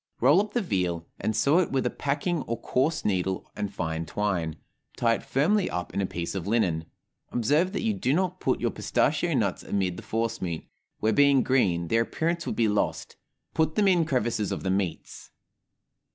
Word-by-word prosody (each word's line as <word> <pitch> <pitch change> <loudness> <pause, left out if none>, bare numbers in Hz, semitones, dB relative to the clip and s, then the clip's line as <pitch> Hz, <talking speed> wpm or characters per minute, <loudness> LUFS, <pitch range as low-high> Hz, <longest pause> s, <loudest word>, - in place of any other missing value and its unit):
Roll 145 +10 +5
up 210 0 -6
the 240 - +1
veal, 90 - -1
and 110 - -1
sew 140 +10 +4
it 180 - 0
with 135 -1 0
a - - +1
packing 145 +4 -1
or 115 0 -2
coarse 145 +7 0
needle 95 -2 0
and 105 -1 -3
fine 80 -4 -3
twine, 85 -2 -1 0.4
tie 115 -1 +3
it - - -2
firmly 180 +9 +1
up 90 0 -4
in 100 - 0
a 95 - 0
piece 85 -1 -4
of 95 -2 -4
linen. 90 -8 +1 0.5
Observe 150 +10 +2
that 200 - -3
you 225 -1 +1
do 185 -10 -1
not 185 +3 0
put - - 0
your - - 0
pistachio - - +1
nuts - - 0
amid 95 -3 -1
the - - -7
force 115 +1 -2
meat, 85 -3 -4 0.3
where, 110 +1 +2
being 140 -1 +5
green, 90 -10 +2
their 115 +6 +3
appearance 165 +8 -1
would - - -2
be 115 - +2
lost; 105 0 -1 0.4
put 160 0 +1
them 205 -2 +3
in 180 -3 +4
crevices 120 -8 0
of - - -3
the 95 - 0
meats. 95 -3 -3
115 Hz, 195 wpm, -27 LUFS, 95-155 Hz, 0.5 s, Roll